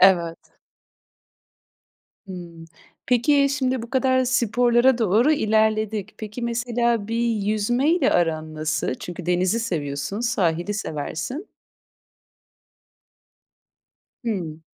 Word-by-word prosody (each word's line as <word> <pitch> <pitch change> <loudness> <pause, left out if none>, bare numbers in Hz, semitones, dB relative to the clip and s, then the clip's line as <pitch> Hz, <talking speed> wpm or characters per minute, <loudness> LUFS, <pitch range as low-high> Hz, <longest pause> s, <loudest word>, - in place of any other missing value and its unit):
Evet. 170 -3 +4 1.9
Hımm, 170 -3 -9 0.4
peki, 280 +4 +3
şimdi 260 -3 -1
bu 235 - -9
kadar 260 -1 +2
sporlara 245 +1 +3
doğru 225 +6 +3
ilerledik. 220 -4 +1
Peki, 215 +2 -7
mesela 235 -2 0
bir 230 +1 -1
yüzmeyle 240 - +1
aran 160 -2 0
nasıl? 155 -3 -1
Çünkü 175 +4 -8
denizi 180 +5 +1
seviyorsun, 155 -2 -3
sahili 200 -5 0
seversin. 200 - -4 2.8
Hımm. 170 -9 -3
220 Hz, 85 wpm, -23 LUFS, 175-245 Hz, 2.8 s, Evet